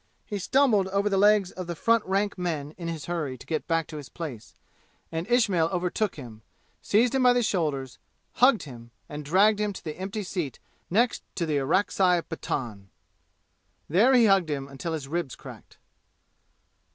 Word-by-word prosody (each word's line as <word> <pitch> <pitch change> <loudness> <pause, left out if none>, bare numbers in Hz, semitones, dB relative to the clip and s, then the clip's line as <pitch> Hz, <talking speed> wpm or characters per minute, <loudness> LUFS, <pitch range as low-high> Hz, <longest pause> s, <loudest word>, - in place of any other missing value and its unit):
He 205 - -4
stumbled 225 -3 +3
over 200 +2 0
the 195 - +1
legs 205 -2 +4
of 185 -2 -7
the 175 - -4
front 230 +5 +2
rank 200 +2 0
men 160 -5 -3
in 170 -2 -7
his 165 -2 -5
hurry 155 -7 -3
to - - -14
get 160 - -3
back 165 -1 +1
to 155 - -9
his 145 -3 -9
place, 140 -10 -8 0.6
and 165 +5 -4
Ismail 200 -9 +3
overtook 180 +3 -1
him, 115 -6 -10 0.4
seized 230 +4 +2
him 265 - +2
by 250 -1 +6
the 245 0 +2
shoulders, 150 - -2 0.4
hugged 250 -2 +5
him, 120 -5 -11 0.2
and 150 0 -7
dragged 200 +8 +4
him 210 -1 0
to - - -10
the 155 +1 -6
empty 200 +3 -4
seat 175 - -4 0.3
next 230 +6 +2
to 170 - -1
the 155 -2 0
Orakzai 180 +4 +2
Pathan. 115 -11 -5 1.0
There 220 - +4
he 240 -2 +6
hugged 195 -5 +3
him 140 -2 -3
until 140 +4 -5
his 150 -4 -4
ribs 160 -3 -3
cracked. - - -13
175 Hz, 175 wpm, -26 LUFS, 150-205 Hz, 1.0 s, by